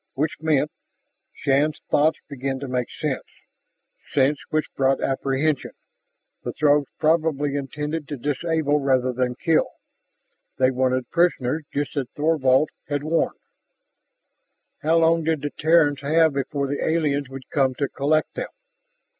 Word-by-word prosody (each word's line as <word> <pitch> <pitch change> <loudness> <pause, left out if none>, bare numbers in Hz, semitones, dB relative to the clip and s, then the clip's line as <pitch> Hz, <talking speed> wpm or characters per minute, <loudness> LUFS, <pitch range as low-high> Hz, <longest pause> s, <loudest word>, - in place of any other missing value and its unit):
Which 150 +2 -2
meant, 155 -2 +1 0.6
Shann's 145 +3 +1
thoughts 155 +2 +3
began 135 -1 -3
to 140 - -4
make 125 -1 -2
sense - - -3 0.8
sense 140 +1 +2
which 155 0 -1
brought 135 0 +2
apprehension 135 +2 -1 0.7
the - - -4
Throgs 145 -2 +3
probably 155 -3 +1
intended 150 +2 -4
to 145 - -5
disable 150 +2 0
rather 130 -2 +1
than 125 0 -1
kill. 165 +3 +2 0.9
They 130 0 +3
wanted 130 0 0
prisoners, 160 -4 +1
just 145 -1 -3
as 135 -3 -1
Thorvald 150 -2 +2 0.2
had 145 -1 -2
warned. 165 +2 0 1.4
How 160 +2 +3
long 165 0 +3
did 160 -2 0
the 145 - -2
Terrans 150 -3 +3
have 160 +2 +3
before 140 +1 -2
the 140 +1 -2
aliens 145 -4 0
would 135 -1 -9
come 135 -4 +2
to 140 - -1
collect 155 +4 0
them? - - -4
145 Hz, 135 wpm, -23 LUFS, 135-155 Hz, 1.4 s, thoughts